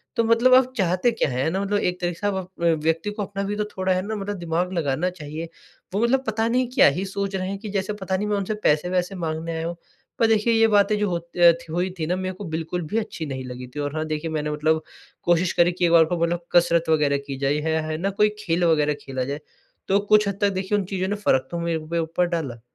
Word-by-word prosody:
तो 230 - +2
मतलब 230 +3 +4
आप 255 0 +4
चाहते 185 +4 +2
क्या 225 - 0
हैं? 130 0 -1
है - - +1
ना? 190 +4 -1
मतलब 205 +1 0
एक 180 -1 -1
तरीके 175 -1 -2
से 205 - -1
आप 205 - 0
अप 185 -2 -6 0.2
व्यक्ति 165 +6 0
को 210 - -5
अपना 200 0 -4
भी 200 +1 -2
तो 210 - 0
थोड़ा, 185 0 +1
है 185 - 0
ना, 220 - -2
मतलब 205 0 -4
दिमाग 175 +1 -2
लगाना 155 0 0
चाहिए। 160 -1 -7 0.4
वो 200 - 0
मतलब 260 +3 +2
पता 220 +1 0
नहीं 250 +2 +1
क्या 255 - +6
ही 195 - -2
सोच 195 0 -3
रहे 185 -1 -2
हैं 200 - -3
कि 215 0 -7
जैसे 195 0 -2
पता 190 -2 -2
नहीं, 210 +2 -2
मैं 210 -1 0
उनसे 200 +2 -2
पैसे-वैसे 180 +5 +1
माँगने 165 -1 -3
आया 160 0 -2
हूँ। 170 - -4 0.4
पर 230 - +5
देखिए, 225 +1 +3
ये 225 0 +5
बातें, 210 0 +3
जो 210 -1 +1
होती 170 0 -5
रह 170 -1 +9
थ 170 - -16
हुई 175 +3 0
थी 160 - -1
ना, 180 - +1
मेरे 185 0 -3
को 200 - -8
बिल्कुल 165 +2 -3
भी 215 - -2
अच्छी 210 -7 -3
नहीं 130 -3 -5
लगी 125 0 -7
थी। - - -4
और 145 0 -3
हाँ, 155 0 -1
देखिए, 155 +1 -3
मैंने 150 -1 -2
मतलब 155 +1 +1 0.4
कोशिश 175 +1 +2
करी 175 0 +4
कि 180 0 0
एक 170 - +2
बार 165 -1 +7
को 175 +2 -2
मतलब 170 0 -1
कसरत 170 -1 +3
वगैरह 150 -3 +3
की 135 -1 -4
जाए 140 +1 +1
है, 160 +1 0
है 155 - -5
है 155 - -2
ना? 190 +5 -1
कोई 210 +2 +3
खेल 175 -4 0
वगैरह 150 -3 +3
खेला 130 -1 -3
जाए, 140 +3 -4 0.5
तो 195 +1 +3
कुछ 210 0 +3
हद 200 -1 -2
तक, 205 - +4
देखिए, 190 +1 -1
उन 200 - -1
चीज़ों 185 0 -2
ने 205 - -1
फ़र्क 130 -11 +1
तो 170 - -3
मेरे 170 -1 -1
भी 155 +2 -4
ऊपर 165 +2 0
डाला। 130 -8 -4
180 Hz, 270 wpm, -23 LUFS, 160-200 Hz, 0.5 s, रह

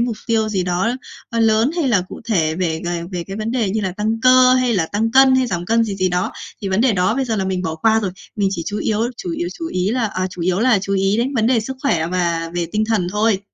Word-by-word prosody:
mục 235 -2 -1
tiêu 225 -2 +1
gì 195 -4 -1
đó, 180 +4 0 0.4
ơ, 230 - -2
lớn 225 +4 +3
hay 320 -6 +1
là 205 -7 +3
cụ - - -9
thể 165 -9 +1
về 165 -2 -1
về 175 -1 -2
về 175 -1 -3
cái 195 +1 -6
vấn 220 +1 -3
đề 230 -6 0
như 215 +2 -1
là 190 -3 -2
tăng 220 +3 -2
cơ 255 0 +6
hay 255 -3 +2
là 165 -4 +1
tăng 220 +5 -1
cân 265 0 +6
hay 260 -1 +2
giảm 175 -5 -3
cân 230 +2 +3
gì 205 - -3
gì 185 -1 +1
đó. 180 0 -1 0.3
Thì 195 - -2
vấn 190 +3 +1
đề 250 -2 +3
đó 185 +3 +1
bây 270 0 0
giờ 225 -3 -2
là 195 - -1
mình 185 -1 -2
bỏ 160 -2 -2
qua 220 +7 +2
rồi. 200 -3 -2 0.3
Mình 200 -2 +1
chỉ 170 - -3
chú 205 0 -3
yếu 215 -1 -1 0.2
chủ 360 +4 -5
yếu, 340 +2 -3
chủ 330 - -4
ý 185 - -1
là 245 -1 0
ờ, 185 -2 -2
chủ 180 -2 -6
yếu 185 +2 +1
là 235 -4 +4
chú 195 +1 -4
ý 195 +1 +1
đến 255 +4 -1
vấn 225 -2 +2
đề 245 -2 +3
sức 265 +5 -6
khỏe 170 - +1
và 170 -2 -1
về 175 -1 -1
tinh 215 +1 +1
thần 200 -6 +1
thôi. 210 -2 +1
210 Hz, 295 wpm, -19 LUFS, 185-230 Hz, 0.4 s, cơ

